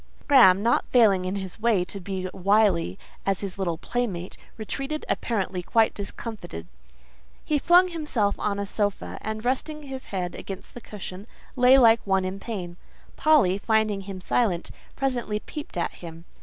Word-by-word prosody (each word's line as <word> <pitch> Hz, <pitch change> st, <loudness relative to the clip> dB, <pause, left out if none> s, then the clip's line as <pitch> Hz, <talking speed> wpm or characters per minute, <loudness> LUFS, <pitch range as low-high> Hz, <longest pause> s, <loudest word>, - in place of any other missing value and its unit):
Graham—not 235 Hz, -5 st, +5 dB
failing 205 Hz, -7 st, +4 dB
in 185 Hz, +2 st, -2 dB
his 190 Hz, +1 st, -5 dB
way 220 Hz, -5 st, +3 dB
to 200 Hz, -, -7 dB
be 190 Hz, 0 st, -4 dB
as 185 Hz, -, -6 dB
wily 190 Hz, -, +2 dB, 0.3 s
as 195 Hz, -1 st, 0 dB
his 195 Hz, -1 st, -5 dB
little 170 Hz, -4 st, -1 dB
playmate—retreated 245 Hz, -, -4 dB
apparently 195 Hz, -5 st, -1 dB
quite 225 Hz, +5 st, +2 dB
discomfited; 200 Hz, -, -7 dB, 0.8 s
he 300 Hz, -1 st, +1 dB
flung 355 Hz, +4 st, +6 dB
himself 300 Hz, -, 0 dB
on 200 Hz, -1 st, -1 dB
a 200 Hz, -, -2 dB
sofa, 205 Hz, 0 st, -2 dB
and 220 Hz, +1 st, -5 dB
resting 300 Hz, +4 st, -2 dB
his 270 Hz, -2 st, -7 dB
head 180 Hz, -3 st, -3 dB
against 195 Hz, -1 st, -8 dB
the 245 Hz, -, -9 dB
cushion, 200 Hz, -1 st, -8 dB, 0.3 s
lay 255 Hz, +1 st, +6 dB
like 230 Hz, -3 st, +6 dB
one 190 Hz, -1 st, +1 dB
in 190 Hz, +1 st, -4 dB
pain. 185 Hz, -6 st, -6 dB, 0.4 s
Polly, 275 Hz, -12 st, +4 dB
finding 215 Hz, -2 st, +1 dB
him 195 Hz, -1 st, -7 dB
silent, 185 Hz, -2 st, 0 dB, 0.2 s
presently 245 Hz, -6 st, -1 dB
peeped 295 Hz, -, -8 dB
at 170 Hz, -, -1 dB
him. 165 Hz, -1 st, -11 dB
205 Hz, 155 wpm, -25 LUFS, 185-240 Hz, 0.8 s, flung